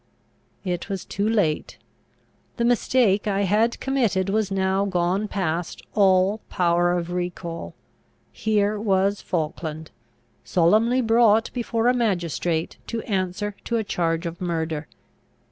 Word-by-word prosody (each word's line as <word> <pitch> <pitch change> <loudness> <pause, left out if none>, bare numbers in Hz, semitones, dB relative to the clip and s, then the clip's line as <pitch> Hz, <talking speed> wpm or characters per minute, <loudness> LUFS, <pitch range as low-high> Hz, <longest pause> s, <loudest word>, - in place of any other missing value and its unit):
It 180 +1 -3
was 195 -2 -4
too 205 +2 -1
late: 195 -9 0 0.8
the 235 - +1
mistake 235 -4 +2
I 200 -1 +1
had 215 +4 +2
committed 225 -9 0
was 215 -1 +1
now 190 0 +1
gone 190 +1 0
past 175 -4 -3
all 195 +1 +3
power 175 0 +2
of 175 0 -4
recall. 175 -1 -4 0.6
Here 210 -1 0
was 200 -1 +1
Falkland, 160 -1 -4 0.5
solemnly 220 +9 +3
brought 225 -1 +4
before 235 -1 -1
a 250 - +5
magistrate 175 -7 -1
to 230 -1 -3
answer 195 +1 -2
to 235 - 0
a 220 - 0
charge 165 -3 -1
of 170 +1 -5
murder. 160 -3 -2
195 Hz, 125 wpm, -24 LUFS, 175-220 Hz, 0.8 s, a